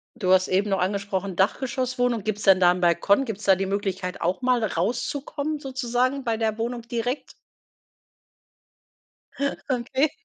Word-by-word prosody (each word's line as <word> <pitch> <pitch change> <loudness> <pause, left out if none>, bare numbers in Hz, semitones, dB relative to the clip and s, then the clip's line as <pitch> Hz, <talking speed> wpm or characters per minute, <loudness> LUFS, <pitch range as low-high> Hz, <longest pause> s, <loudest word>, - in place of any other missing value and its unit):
Du 190 -6 0
hast 185 0 +4
eben 195 +3 +1
noch 195 -1 +1
angesprochen, 195 0 -2
Dachgeschosswohnung. 245 +3 0
Gibt's 210 0 -3
denn 190 -2 +6
da 175 0 +6
'nen 180 - -5
Balkon? 180 +8 +3
Gibt's 215 -3 -6
da 195 -1 +5
die 195 - -1
Möglichkeit 190 -2 -3
auch 180 +7 0
mal 250 -2 +2
rauszukommen 270 - -2
sozusagen 255 0 -1
bei 230 -2 0
der 220 -1 -1
Wohnung 235 +1 -3
direkt? 240 +3 -3 2.4
Okay. 260 +3 +1
220 Hz, 140 wpm, -25 LUFS, 190-250 Hz, 2.4 s, denn